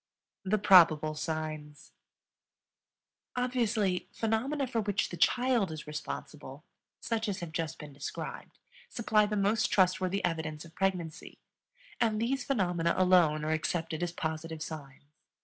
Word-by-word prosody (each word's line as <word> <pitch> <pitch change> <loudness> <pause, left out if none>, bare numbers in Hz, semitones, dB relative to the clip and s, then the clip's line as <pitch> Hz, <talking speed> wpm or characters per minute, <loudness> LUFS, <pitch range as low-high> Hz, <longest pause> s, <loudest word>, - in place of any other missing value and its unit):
THE 200 +2 +1
PROBABLE 165 -6 +6
SIGNS. 155 -1 -5 1.4
Obviously, 230 -7 0
phenomena 250 +6 -1
for 235 -3 -1
which 205 -1 0
the - - -6
child 240 +1 +2
is 155 -1 -7
responsible 150 -1 -7 0.4
such 225 -1 -2
as 195 - -3
have 170 -2 -6
just 165 -1 -3
been 150 -2 -10
described 140 - -7 0.3
supply 215 -2 +2
the 210 0 -2
most 205 +3 +2
trustworthy 185 0 +2
evidence 160 -2 -3
of 165 - -15
pregnancy; 180 -4 -2 0.6
and 220 -3 +2
these 265 +4 0
phenomena 175 -9 +1
alone 175 -5 +4
are 155 - 0
accepted 160 0 -1
as 175 -1 -1
positive 160 -1 -4
signs. 145 -5 -9
180 Hz, 130 wpm, -30 LUFS, 155-215 Hz, 1.4 s, PROBABLE